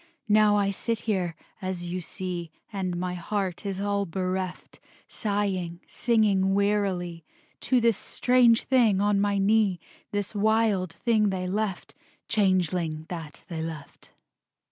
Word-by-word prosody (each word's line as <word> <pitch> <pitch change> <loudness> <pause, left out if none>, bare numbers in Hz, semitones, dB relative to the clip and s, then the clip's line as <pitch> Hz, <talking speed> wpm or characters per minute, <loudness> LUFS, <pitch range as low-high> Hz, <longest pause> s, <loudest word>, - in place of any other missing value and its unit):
Now 210 0 +5
I 200 -1 +2
sit 225 +3 -2
here, 185 -6 -1 0.3
as 185 -2 -3
you 175 +1 -3
see, 175 -1 -5 0.2
And 185 -3 -2
my 180 0 -2
heart 190 +1 -3
is 195 -1 -3
all 200 0 0
bereft, 185 +1 -3 0.3
Sighing, 195 -5 -2
singing 200 -5 +2
wearily 195 -5 0 0.4
To 255 - +2
this 230 -3 +3
strange 245 -2 +3
thing 235 -7 +3
on 205 0 +2
my 205 0 +1
knee, 200 -2 +3 0.3
This 205 0 -3
wild 210 -3 +2
thing 220 -4 +2
they 185 -1 -2
left, 200 -1 -2 0.3
Changeling 180 -6 +1
that 160 -4 -7
they 165 -2 -4
left. 160 -3 -8
195 Hz, 130 wpm, -27 LUFS, 180-210 Hz, 0.4 s, Now